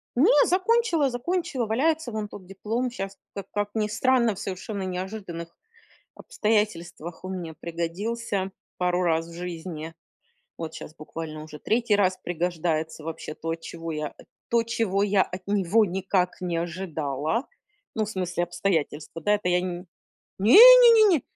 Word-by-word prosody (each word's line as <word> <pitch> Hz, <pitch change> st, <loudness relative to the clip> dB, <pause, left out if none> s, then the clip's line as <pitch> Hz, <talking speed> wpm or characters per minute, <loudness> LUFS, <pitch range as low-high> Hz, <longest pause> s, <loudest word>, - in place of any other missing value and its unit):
Не, 425 Hz, -, +5 dB
закончила, 370 Hz, -, +2 dB
закончила, 280 Hz, 0 st, -2 dB
валяется 275 Hz, +4 st, 0 dB
вон 215 Hz, -1 st, -3 dB
тот 190 Hz, -2 st, -11 dB
диплом. 225 Hz, +6 st, -3 dB
Щас 195 Hz, -3 st, -6 dB, 0.2 s
ка 200 Hz, -, -6 dB
как 205 Hz, 0 st, -1 dB
ни 210 Hz, -1 st, +1 dB
странно, 235 Hz, -1 st, +2 dB
в -, -, -9 dB
совершенно 195 Hz, +1 st, -5 dB
неожиданных 180 Hz, -2 st, -5 dB, 0.6 s
обстоятельствах 185 Hz, -6 st, -2 dB
он 185 Hz, -, -4 dB
мне 165 Hz, -2 st, -6 dB
пригодился 190 Hz, +5 st, -3 dB, 0.3 s
пару 180 Hz, 0 st, +1 dB
раз 165 Hz, -1 st, +1 dB
в 170 Hz, -, -11 dB
жизни. 165 Hz, -2 st, -6 dB, 0.6 s
Вот 165 Hz, -1 st, -5 dB
щас 155 Hz, -, -9 dB
буквально 155 Hz, 0 st, -7 dB
уже 155 Hz, -1 st, -10 dB
третий 225 Hz, +3 st, +1 dB
раз 185 Hz, -2 st, +2 dB
пригождается 165 Hz, -2 st, -2 dB
вообще 160 Hz, -1 st, -6 dB
то, 165 Hz, 0 st, -3 dB
чего 165 Hz, 0 st, -7 dB
я 150 Hz, -1 st, -4 dB, 0.3 s
то 235 Hz, -1 st, +3 dB
чего 220 Hz, -4 st, 0 dB
я 200 Hz, -1 st, +3 dB
от 180 Hz, +1 st, -7 dB
него 205 Hz, +2 st, +3 dB
никак 185 Hz, -1 st, -1 dB
не 175 Hz, -2 st, -2 dB
ожидала. 165 Hz, -, -2 dB, 0.5 s
Ну, 220 Hz, -, +1 dB
в -, -, -7 dB
смысле 180 Hz, -3 st, -1 dB
обстоятельства, 165 Hz, -3 st, -2 dB
да 210 Hz, +5 st, +3 dB
это 205 Hz, -3 st, -1 dB
я 180 Hz, -, +3 dB
Н 180 Hz, 0 st, -4 dB, 0.5 s
не-не-не, 440 Hz, -, +8 dB
190 Hz, 145 wpm, -26 LUFS, 170-225 Hz, 0.6 s, не-не-не